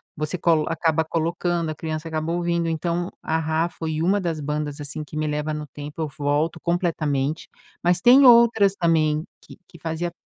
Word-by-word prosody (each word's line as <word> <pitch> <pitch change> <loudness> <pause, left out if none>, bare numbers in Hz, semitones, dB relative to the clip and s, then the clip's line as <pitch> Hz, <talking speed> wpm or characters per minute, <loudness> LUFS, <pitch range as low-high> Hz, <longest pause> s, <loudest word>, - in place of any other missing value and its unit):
você 155 +4 -3
colo 160 -2 +2
acaba 160 -1 +1
colocando, 170 +1 -1
a - - -6
criança 155 +1 -5
acaba 160 0 -2
ouvindo, 170 -1 0
então, 170 +2 -2
A-Ha 160 +1 0
foi 160 -2 -4
uma 195 +3 +2
das 165 -3 -2
bandas, 150 0 -3
assim, 145 +2 -5
que 150 +1 -9
me 155 - -1
leva 150 +1 -2
no 150 0 -4
tempo, 145 +3 -10
eu - - -2
volto 150 +3 0
completamente, 160 -4 -1 0.3
mas 175 0 +3
tem 255 +7 +7
outras 235 -5 +6
também 160 -3 +1 0.2
que - - -14
que 170 - -16
fazia 165 +2 -3
160 Hz, 175 wpm, -23 LUFS, 155-170 Hz, 0.3 s, tem